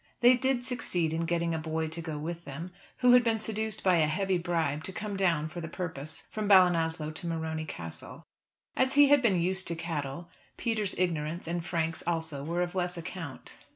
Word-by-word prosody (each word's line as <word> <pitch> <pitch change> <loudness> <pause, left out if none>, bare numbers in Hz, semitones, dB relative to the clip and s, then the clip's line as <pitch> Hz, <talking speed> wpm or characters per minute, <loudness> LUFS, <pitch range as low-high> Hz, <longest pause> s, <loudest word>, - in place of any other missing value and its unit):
They 245 +1 +8
did 255 -1 0
succeed 180 -10 0
in 165 +1 -1
getting 170 -1 0
a 160 - -1
boy 160 0 -2
to 165 +1 -4
go 160 -2 -5
with 170 +3 -5
them, 165 +6 -7 0.3
who 250 -1 +7
had 250 0 +7
been 230 -1 +2
seduced 220 -1 -3
by 185 -2 +4
a 155 -2 +3
heavy 185 +3 0
bribe 165 -4 -1
to - - -4
come 205 +2 -4
down 170 -6 +1
for 170 +2 -7
the 165 - -5
purpose 160 -4 -3
from 215 -1 -3
Ballinasloe 165 -4 +4
to 170 +2 -5
Morony 160 -1 -2
Castle. 85 - -7 0.5
As 260 0 +2
he 285 0 +7
had 290 -2 +6
been 200 -7 +3
used 185 +2 +1
to 170 - -2
cattle, 165 -1 -4 0.3
Peter's 215 -4 -1
ignorance 165 -2 -1
and 170 0 -2
Frank's 165 -1 -1
also 160 -4 -1
were 170 +4 0
of 175 - -4
less 180 -1 -1
account. 165 -4 -7
170 Hz, 200 wpm, -29 LUFS, 160-190 Hz, 0.5 s, They